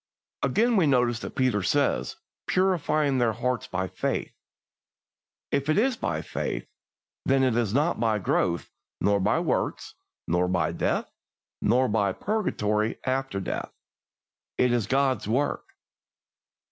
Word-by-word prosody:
Again, 235 +1 +2
we 170 -5 +4
notice 125 -4 +2
that - - -7
Peter 130 -6 +2
says, 140 +9 +1 0.3
"purifying 155 -7 +2
their 120 -2 +2
hearts 125 +2 -2
by 95 +1 -2
faith." - - -3 1.2
If 140 +2 0
it 155 - +3
is 250 +4 +3
by 85 - -2
faith, - - -3 0.6
then 135 0 +3
it 130 -3 +2
is 115 -4 +1
not 145 +6 +1
by 110 -2 +2
growth, 90 -3 0 0.3
nor 100 +1 +2
by 95 - +2
works, - - -1 0.3
nor 90 +1 +2
by 85 -3 +1
death, - - -1 0.5
nor 125 +4 +3
by 105 -3 +1
purgatory 110 - -1
after 130 -5 -1
death. 95 - -4 0.9
It 125 -1 +3
is 115 -5 0
God's 130 -5 +1
work. 130 +7 0
125 Hz, 135 wpm, -26 LUFS, 105-140 Hz, 1.2 s, we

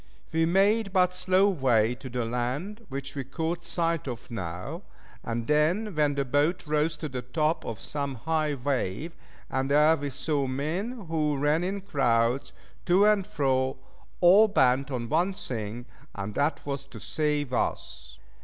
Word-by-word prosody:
We 165 0 +3
made 200 +4 +3
but 180 -1 +3
slow 185 +2 +3
way 125 - +2
to 130 +1 -9
the 120 -1 -2
land, 140 - -3
which 135 0 -5
we 140 -2 -4
caught 165 +6 -3
sight 165 -3 -1
of 125 0 -6
now 90 -5 -5 0.4
and 115 0 -3
then 170 - +2
when 150 -2 +2
the 140 -1 0
boat 145 +8 +1
rose 150 +1 0
to 155 - -4
the 130 -3 -5
top 155 +6 0
of 110 -4 -5
some 140 -2 -3
high 155 +3 0
wave, 140 - -2 0.3
and 135 0 -1
there 150 +3 +5
we 145 -2 -4
saw 140 +1 -1
men 180 - -3
who 155 -3 0
ran 150 +4 +2
in 195 +2 -2
crowds, 125 -7 +1 0.4
to 185 +3 +5
and 210 -2 +3
fro, 130 -8 0 0.4
all 195 +5 +7
bent 135 -8 +3
on 120 -3 -3
one 175 +8 +1
thing, 120 - -5 0.3
and 100 +1 -4
that 145 +4 0
was 140 -1 -4
to 120 -5 -11
save 150 0 -1
us. 65 - -3
145 Hz, 165 wpm, -27 LUFS, 130-170 Hz, 0.4 s, all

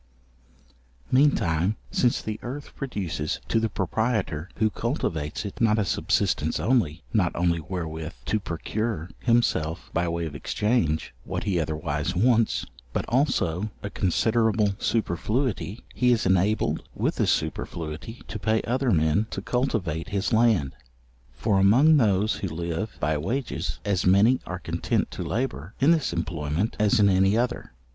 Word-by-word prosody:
Mean 145 +3 +5
time, 85 +4 0 0.2
since 120 -2 +1
the 110 0 -4
earth 135 +4 -7
produces 90 - -3
to 115 - +3
the 110 0 0
proprietor 100 -4 -1
who 110 0 +1
cultivates 85 - -2
it, 100 - -6
not 110 -2 +4
a 105 - +1
subsistence - - 0
only, 90 - +1
not 95 -7 +2
only 85 -1 +1
wherewith 80 -1 -5
to 110 - +1
procure 95 0 -3
himself 115 -9 +1
by 85 +1 +1
way 85 0 -2
of 80 - -6
exchange, 80 0 0
what - - -4
he 95 -5 0
otherwise 80 +1 -2
wants, 115 +3 +2 0.3
but - - -1
also 110 - +1
a 100 - -4
considerable 110 +2 +2
superfluity; 110 +2 -1
he 125 -1 +3
is 115 -2 +2
enabled 95 +3 +2
with - - -1
this - - +2
superfluity, 80 +7 -3
to 105 - -5
pay 110 +3 +1
other 130 +2 0
men 80 +3 +2
to - - -4
cultivate 100 - -1
his 100 +4 -1
land. 110 - +3 0.6
For 100 - +1
among 130 +11 +6
those 105 -3 +2
who 95 - -3
live 85 +5 -4
by 75 +1 0
wages, 125 - -3
as 100 -3 +1
many 100 +7 +5
are 90 - -3
content 90 - -1
to - - -6
labour 70 - -3
in 145 +5 +5
this 160 -6 +2
employment 85 +2 -2
as 105 0 +3
in 100 - +6
any 95 +2 +4
other. 120 - -2
100 Hz, 150 wpm, -26 LUFS, 85-115 Hz, 0.6 s, among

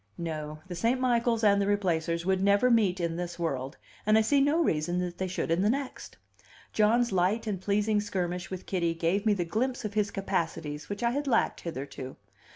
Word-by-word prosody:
No; 155 -2 -4
the 180 - -6
St. 230 +9 +1
Michaels 235 -2 +1
and 200 -1 +5
the 200 - 0
Replacers 170 -4 0
would 190 0 +1
never 200 +5 +4
meet 200 -6 +3
in 170 -1 -1
this 175 -1 -4
world, 135 -6 -3 0.3
and 215 +1 +4
I - - +5
see 275 +6 +3
no 290 +4 +3
reason 165 - 0
that 180 -1 -3
they 190 - -1
should 180 -2 -3
in 170 +2 +2
the 205 - +3
next. 270 +2 -4 0.6
John's 230 +2 +3
light 190 +5 +1
and 200 -4 -3
pleasing 210 +1 +1
skirmish 180 -3 -3
with 185 -1 -6
Kitty 170 -3 0
gave 175 +6 0
me 210 - +4
the 175 -3 -1
glimpse 240 +7 -1
of 210 - -4
his 210 -1 +1
capacities 165 -7 -3
which 205 +3 -4
I 235 - +3
had 285 +3 -2
lacked 255 - +1
hitherto. 135 -4 -6
195 Hz, 205 wpm, -29 LUFS, 170-220 Hz, 0.6 s, and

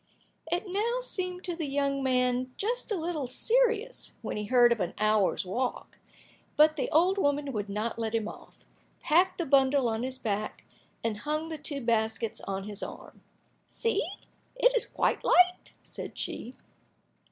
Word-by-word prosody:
It 350 +1 +1
now 440 +6 0
seemed 365 -7 -3
to 350 -2 -3
the 325 -3 -3
young 275 0 0
man 255 -1 +1
just 475 +3 -2
a - - +2
little 325 -5 -2
serious, 470 - +1
when - - -3
he 210 - -3
heard 240 +1 +5
of 235 - +2
an 180 -3 -2
hour's 215 -3 +2
walk, 245 +7 -3 0.6
but 310 +1 +6
the 285 - -2
old 365 +5 +3
woman 285 -3 +1
would 205 -2 -3
not 215 +3 -2
let 225 0 -1
him 220 -2 0
off, - - -11 0.5
packed 365 +4 +3
the 345 - -1
bundle 270 -2 +4
on 225 0 -1
his 260 +1 -3
back, 215 -3 -3 0.4
and 225 -2 -1
hung 305 +7 -2
the 315 -2 -5
two 290 -1 -3
baskets 225 -2 0
on 195 0 -2
his 205 0 -5
arm. - - -9 0.5
"See, 460 - 0 0.5
it - - +4
is 485 - +2
quite - - 0
light," 360 0 +4
said - - -7
she. 245 +3 -5
275 Hz, 165 wpm, -29 LUFS, 230-360 Hz, 0.6 s, but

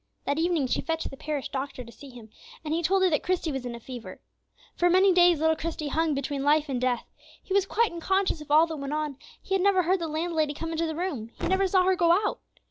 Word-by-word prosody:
That 285 +2 0
evening 335 -4 +1
she 255 - 0
fetched 325 0 -3
the - - -8
parish 295 0 -4
doctor 265 -1 -5
to 235 - -13
see 280 +4 -13
him, 235 -4 -13 0.3
and 305 - -2
he 335 - 0
told 380 +3 +2
her 375 - +5
that 300 - +1
Christie 360 -3 -1
was 265 -3 -4
in 240 - -5
a - - -9
fever. 245 -1 -9 0.6
For 350 - +2
many 375 +2 +5
days 350 -3 +5
little 320 +1 +3
Christie 315 -2 -4
hung 320 0 0
between 275 0 -3
life 295 +1 +2
and 250 -2 -2
death. 250 -2 0 0.4
He 380 - -5
was 395 -1 +2
quite 460 +1 +1
unconscious 370 0 0
of 300 - -11
all 310 +2 +6
that 320 -1 -6
went 280 +1 -4
on; 300 -3 -2 0.3
he 385 - -1
never 375 -1 +3
heard 370 +3 +1
the 335 - -3
landlady 315 -1 -1
come 325 +2 -5
into 330 0 -1
the 315 - -4
room; 300 -11 -3
he - - -2
never 380 +1 +2
saw 370 0 +3
her 375 +1 +3
go 340 -2 +3
out. 415 +4 0
320 Hz, 255 wpm, -27 LUFS, 280-360 Hz, 0.6 s, all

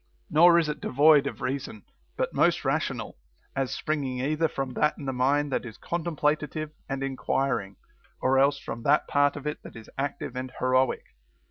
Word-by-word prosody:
Nor 170 +3 +7
is 165 -2 +2
it 150 - -4
devoid 145 +1 +5
of - - -6
reason, 130 -6 -4 0.3
but - - -1
most - - +2
rational, - - -2 0.4
as 135 -2 -1
springing 140 -4 -2
either 155 +5 +1
from 135 -4 -4
that 150 +4 +1
in 145 - -8
the 135 - -2
mind 140 +3 +1
that - - 0
is 115 -3 -9
contemplative 155 -2 -2 0.2
and 135 0 -2
enquiring, 135 -6 -1 0.4
or 135 +1 +3
else 140 +1 +4
from 115 -3 -7
that 145 +5 +3
part 145 0 +2
of 145 -1 -8
it 150 - -3
that - - -12
is 115 -1 -12
active 140 -1 -3
and 130 0 -5
heroic. 130 0 +2
140 Hz, 175 wpm, -27 LUFS, 130-150 Hz, 0.4 s, Nor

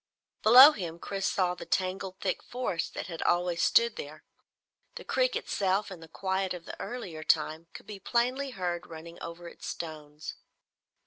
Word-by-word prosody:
Below 255 +7 +10
him, 170 - -5
Chris 195 +2 -3
saw 180 -2 +1
the 180 - -9
tangled 185 0 -2
thick 185 -2 -1
forests 245 -9 -3
that - - -6
had 170 -2 -6
always 175 -1 +1
stood 235 -1 +4
there. 150 +2 -8 0.7
The 485 - -7
creek - - +1
itself, 195 +1 0
in 185 - -8
the 165 - -12
quiet 190 +2 -2
of 170 -1 -10
this - - -7
earlier 190 -11 -6
time, 155 +1 +1
could - - -10
be 205 -2 -8
plainly 250 +6 0
heard 180 -7 -3
running 165 +1 -10
over 170 +1 -7
its - - -10
stones. 155 -2 -7
185 Hz, 170 wpm, -29 LUFS, 170-210 Hz, 0.7 s, Below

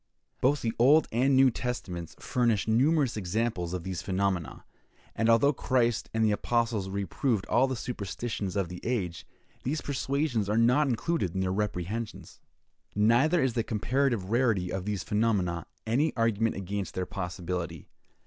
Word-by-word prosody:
Both 140 +2 +2
the 115 -1 0
Old 145 +6 +6
and 130 +4 +3
New 130 -1 +6
Testaments 90 -10 -5
furnish 115 -6 +1
numerous 135 +4 +3
examples 105 -2 -1
of 90 - -5
these 95 -1 -4
phenomena; 95 -6 -2 0.5
and 115 +1 +1
although 130 +6 +5
Christ 120 -3 0
and 110 0 +1
the 105 - +3
apostles 115 -2 0
reproved 100 - -1
all 130 +3 +3
the 130 - -2
superstitions 110 -3 -4
of 100 -3 0
the 90 +1 -8
age, 95 -9 -2 0.3
these 150 +5 -2
persuasions 135 -5 -1
are 105 - +1
not 125 +6 +4
included 120 - -1
in 95 - 0
their 95 0 0
reprehensions. 105 +2 -4 0.6
Neither 120 - +4
is 130 -3 +1
the 115 - +1
comparative 115 -2 0
rarity 110 -7 +2
of 95 -1 -3
these 105 -3 -2
phenomena 100 -6 0 0.2
any 135 +8 +1
argument 115 -1 +1
against 95 -1 -4
their 95 - -1
possibility. 90 -2 -5
110 Hz, 150 wpm, -28 LUFS, 95-125 Hz, 0.6 s, Old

